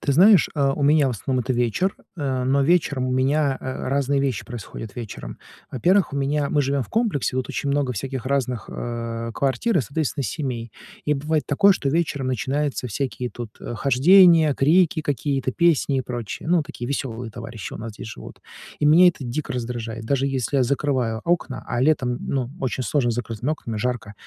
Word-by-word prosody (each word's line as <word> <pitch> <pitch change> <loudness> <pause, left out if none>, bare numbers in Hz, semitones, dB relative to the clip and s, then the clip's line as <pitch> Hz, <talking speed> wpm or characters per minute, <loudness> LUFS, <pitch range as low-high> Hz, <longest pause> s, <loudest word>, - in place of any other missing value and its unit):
ты 140 - 0
знаешь, 190 +4 +6
э, 140 -3 +2
у 145 - -2
меня, 145 0 +4
в - - +1
основном, 125 +3 -2
это 130 +1 -1
вечер, 120 - 0 0.2
э, 130 -3 -1
но 135 +2 +2
вечером 145 -4 +2
у - - -1
меня, 135 +2 +2
а, 130 0 -5
разные 140 +1 +1
вещи 135 -4 -1
происходят 115 -3 -8
вечером. 105 - -7 0.3
Во-первых, 180 - +2
у - - -3
меня 140 +1 0
мы 150 - +2
живём 140 0 0
в 110 - -10
комплексе, 215 - 0
тут 130 - -2
очень 140 - -2
много 140 -2 +1
всяких 130 +3 -4
разных, 125 -4 -1
э, 115 -1 -4
квартир 140 - +1
и, - - +3
соответственно, 140 +3 -2
семей. 120 - -4 0.4
И 150 - +3
бывает 150 +2 -1
такое, 195 +8 +5
что 145 - -2
вечером 145 -3 0
начинаются 130 +3 -1
всякие 125 +1 -3
тут, 120 -3 -8
э, - - -6
хождения, 160 - +6
крики 160 +4 +3
какие-то, 140 -2 -1
песни 165 -4 +2
и - - +1
прочее. 120 -2 -6
Ну, 175 -1 +3
такие 120 -4 -7
весёлые 125 -3 -4
товарищи 115 -1 -8
у - - -7
нас 115 0 -6
здесь 110 - -9
живут. 110 - -10 0.4
И - - +1
меня 165 +5 +7
это 160 -6 -3
дико 130 +5 -3
раздражает, 115 -2 -4
даже 135 +3 +1
если 135 0 -1
я - - +4
закрываю 125 -4 0
окна, 170 -6 -1
а 120 - -2
летом, 130 -4 +2
ну, 130 -3 -2
очень 130 0 -2
сложно 120 +2 +1
с - - -1
закрытыми 120 +3 -3
окнами, 115 -8 -5
жарко. 120 -2 -2
135 Hz, 195 wpm, -23 LUFS, 120-150 Hz, 0.4 s, меня